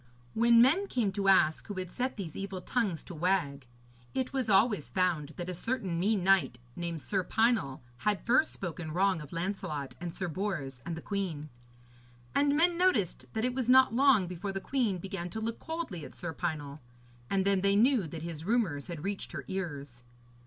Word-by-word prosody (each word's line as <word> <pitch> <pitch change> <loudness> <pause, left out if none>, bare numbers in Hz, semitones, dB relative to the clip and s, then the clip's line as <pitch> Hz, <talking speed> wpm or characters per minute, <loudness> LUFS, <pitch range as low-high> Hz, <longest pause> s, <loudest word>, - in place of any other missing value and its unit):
When 235 +1 +6
men 340 +11 +3
came 230 - 0
to 195 0 -2
ask 160 -5 +4
who 205 - -5
had 185 -2 -5
set 255 +4 -2
these 175 -7 -6
evil 195 -1 -4
tongues 195 -4 -1
to 180 - -9
wag, 155 -6 0 0.5
it 260 0 -1
was 260 -4 -1
always 200 - +3
found 175 -6 0
that 175 - -4
a 185 - -3
certain 185 -3 -2
mean 200 +1 +1
knight, 185 -10 +3 0.2
named 170 -3 -4
Sir 190 -2 0
Pinel, 220 - +1 0.2
had 205 +9 -1
first 255 +6 +3
spoken 170 -3 -5
wrong 190 -1 +2
of 150 - -10
Lancelot 165 -5 -3
and 175 -1 -3
Sir 180 +2 -4
Bors 155 -8 -3
and 165 -1 -3
the 160 - -8
queen. 175 -7 -3 0.8
And 285 0 +3
men 340 +1 +3
noticed 255 - +2
that 220 +1 0
it 250 - 0
was 255 -2 -2
not 260 -1 +6
long 260 -6 +5
before 180 +3 -5
the 195 - -3
queen 225 -3 0
began 180 -1 -5
to 220 - -5
look 225 +1 -3
coldly 320 - -5
at - - -10
Sir 170 -2 -5
Pinel, 145 -1 -4 0.5
and 195 -1 +1
then 195 -1 +3
they 200 +1 +3
knew 230 -3 +4
that 160 +1 -7
his 165 -2 -5
rumours 185 - 0
had 170 -4 -6
reached 200 +1 -4
her - - -5
ears. 145 -10 -5
190 Hz, 195 wpm, -30 LUFS, 165-225 Hz, 0.8 s, When